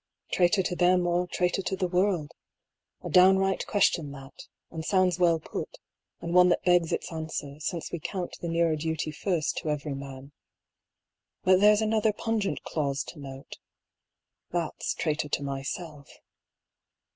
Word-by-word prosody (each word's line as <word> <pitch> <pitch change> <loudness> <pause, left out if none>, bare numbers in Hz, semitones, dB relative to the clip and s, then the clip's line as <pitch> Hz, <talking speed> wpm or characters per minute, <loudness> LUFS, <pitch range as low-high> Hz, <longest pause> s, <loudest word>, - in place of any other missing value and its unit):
Traitor 180 +1 +3
to 180 - -2
them 180 0 +3
or 175 +1 +1
traitor 180 +2 0
to 190 - -2
the 185 -1 -1
world: 180 -4 0 0.7
a - - -4
downright 190 +1 +4
question 170 -7 +2
that, 135 0 -12 0.2
and 160 -1 -5
sounds 185 -1 +2
well 170 -2 +4
put, - - -6 0.4
and 170 - -4
one 180 0 +7
that 175 - +1
begs 175 -2 +3
its - - -2
answer, 155 -3 -5
since 165 +1 -4
we 170 - -3
count 180 +3 -4
the 170 - -3
nearer 165 -1 +2
duty 160 0 -2
first 165 0 -1
to 155 - -3
every 150 -1 -2
man; 135 0 -8 1.1
but 185 0 +5
there's 210 +1 +5
another 220 0 +2
pungent 215 -1 -2
clause 140 -3 -2
to 160 - -11
note... 135 -1 -9 0.9
that's 170 -2 -2
traitor 150 -2 -1
to 145 - -1
myself. 140 +2 -5
170 Hz, 150 wpm, -28 LUFS, 150-185 Hz, 1.1 s, one